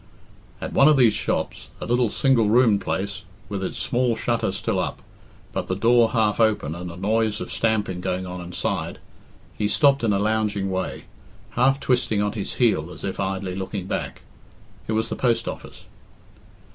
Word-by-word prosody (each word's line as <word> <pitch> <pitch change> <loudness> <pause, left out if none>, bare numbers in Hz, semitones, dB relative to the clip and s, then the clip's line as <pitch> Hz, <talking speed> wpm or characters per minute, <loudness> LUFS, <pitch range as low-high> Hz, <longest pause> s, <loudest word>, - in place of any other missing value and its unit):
At - - -5
one 140 - +6
of 155 -2 +6
these 120 -5 +5
shops, 105 - -2
a - - -5
little 120 -1 +2
single 115 -2 +3
roomed 110 -3 +4
place, 100 +2 -3 0.3
with 100 -2 -3
its - - -4
small 120 -1 +1
shutter 115 +1 0
still - - -1
up, - - -2 0.5
but - - -3
the - - -1
door 115 0 +4
half 110 -3 +2
open 105 -9 +2
and 90 +1 -6
a - - -9
noise 105 +3 0
of - - -6
stamping 105 -5 0
going 90 0 -2
on 90 0 -6
inside, 90 0 -3 0.6
he 105 - 0
stopped 140 +3 +4
in 110 - +2
a 100 - +2
lounging 105 -2 0
way, 95 0 -3 0.5
half 135 +3 +3
twisting 120 -6 +1
on 105 0 +1
his 100 -3 -4
heel 100 -9 +2
as 80 - -11
if 95 - -4
idly 95 -1 -2
looking 95 0 -4
back. - - -4 0.6
It 110 - -1
was 110 +1 0
the - - -2
Post 120 -3 +1
Office. - - -7
105 Hz, 180 wpm, -24 LUFS, 95-115 Hz, 0.6 s, one